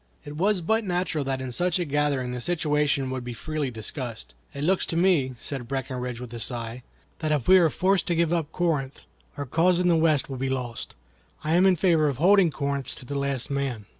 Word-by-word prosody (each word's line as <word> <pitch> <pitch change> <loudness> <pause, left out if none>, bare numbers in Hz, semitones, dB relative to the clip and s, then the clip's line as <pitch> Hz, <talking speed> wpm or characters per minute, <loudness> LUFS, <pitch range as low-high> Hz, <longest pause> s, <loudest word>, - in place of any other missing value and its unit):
It 145 - -7
was 190 +3 +1
but 220 +7 +1
natural 180 -5 -1
that 135 -1 -2
in 130 - -5
such 175 +7 +1
a 175 - -1
gathering 145 -4 0
the 125 0 -4
situation 150 -4 0
would 130 -1 -4
be 120 -1 -6
freely 155 +3 -3
discussed. 115 - -6 0.2
"It 140 - -5
looks 185 +4 +2
to 165 - -2
me," 165 -8 +2
said 130 -1 -5
Breckinridge, 125 -2 -4
with 125 -1 -8
a 120 - -5
sigh, 115 +1 -4 0.4
"that 155 -2 -1
if 145 -5 0
we 185 0 +8
are 165 -3 +4
forced 190 +4 +1
to 170 - +1
give 170 0 +2
up 160 -3 -1
Corinth, 150 -6 -1 0.4
our 145 - -3
cause 170 +6 +2
in 180 0 +2
the 170 - +4
West 160 -3 +2
will 135 - -5
be 135 +1 -2
lost. 125 -3 -4 0.5
I 155 +1 0
am 180 +3 +5
in 185 - +5
favor 165 -3 +3
of 140 -4 -1
holding 185 +3 +5
Corinth 140 -2 -3
to 130 - -12
the 140 - -6
last 140 -2 -2
man." 135 -6 -2
145 Hz, 225 wpm, -26 LUFS, 130-170 Hz, 0.5 s, we